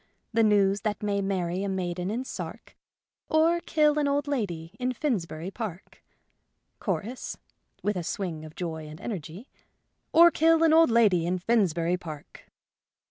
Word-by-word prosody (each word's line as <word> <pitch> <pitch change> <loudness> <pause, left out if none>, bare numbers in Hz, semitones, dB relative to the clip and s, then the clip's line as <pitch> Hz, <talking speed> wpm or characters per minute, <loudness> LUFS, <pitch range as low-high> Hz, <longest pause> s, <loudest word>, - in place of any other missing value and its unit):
The 230 - +3
news 200 -2 +3
that 210 -2 -2
may 200 -1 0
marry 185 -2 -1
a 200 - -2
maiden 180 -1 -2
in 235 +5 -2
Sark, - - -8 0.5
Or 325 +2 +3
kill 300 -2 +2
an 290 - +1
old 285 0 0
lady 175 - -3
in 255 0 0
Finsbury 190 - -2
Park." 205 -5 -7 0.8
Chorus 210 +6 -3 0.5
(with 210 - 0
a 180 - -2
swing 165 -3 -4
of 155 0 -11
joy 160 -3 -5
and 155 +1 -10
energy): 190 - -6 0.3
" - - -49
Or 340 +1 +8
kill 325 +1 +4
an 320 -1 +5
old 325 -2 +6
lady 205 -8 +4
in 180 +1 0
Finsbury 180 -4 +1
Park." 155 -5 -10
200 Hz, 155 wpm, -27 LUFS, 175-255 Hz, 0.8 s, Or